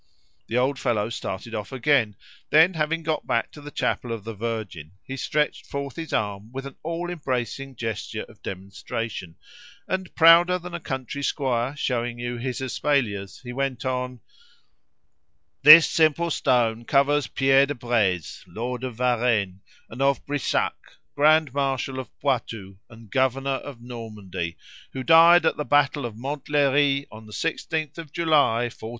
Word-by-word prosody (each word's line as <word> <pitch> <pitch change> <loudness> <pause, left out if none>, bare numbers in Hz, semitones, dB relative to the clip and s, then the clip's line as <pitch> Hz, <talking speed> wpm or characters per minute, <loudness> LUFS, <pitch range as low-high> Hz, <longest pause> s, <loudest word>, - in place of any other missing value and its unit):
The 115 - -1
old 130 +2 +1
fellow 115 -2 0
started 110 +1 -5
off 105 -3 -5
again; 130 -5 +2 0.3
then, 160 +5 +6
having 165 +1 -1
got 155 0 -2
back - - 0
to 150 - -12
the 145 - -8
chapel 125 -4 -2
of 115 -3 -4
the 115 +1 -6
Virgin, 105 -7 -5
he 135 - -6
stretched 150 +3 -1
forth 140 -3 -5
his 165 -1 -6
arm 105 0 -2
with 135 +1 -6
an 140 - -8
all 170 +2 -4
embracing 135 -3 -3
gesture 115 -2 -4
of - - -17
demonstration, 95 -1 -6 0.5
and, 185 -1 -3
prouder 170 +2 +7
than 180 0 -9
a 175 - -3
country 130 -2 -5
squire 130 -2 -1
showing 120 -4 -2
you 120 0 -4
his 130 +2 -4
espaliers, 125 -7 -1
went 130 0 -3
on 125 -2 -3 1.4
"This 155 +3 +10
simple 165 +1 +2
stone 120 -4 +1
covers 140 +2 +2
Pierre 135 0 +3
de 145 - -3
Breze, 110 - -1
lord 120 +7 -5
of 125 -3 -4
Varenne 115 -6 +1 0.3
and 120 +4 -8
of 140 -1 +1
Brissac, 145 -2 -2 0.2
grand 155 -1 +4
marshal 135 -1 -1
of 130 - -7
Poitou, 115 -8 -2
and 115 -3 -15
governor 135 +1 +1
of 130 -5 -10
Normandy, 105 -8 -6 0.4
who 130 - -4
died 165 +3 +7
at - - +2
the 150 - -1
battle 145 -2 +2
of 110 - -10
Montlhery 140 +1 +1
on 110 0 -12
the 105 - -12
16th 160 0 -3
of 160 -4 -9
July, 150 -8 +2
1465." 115 -2 -7
130 Hz, 155 wpm, -24 LUFS, 115-145 Hz, 1.4 s, This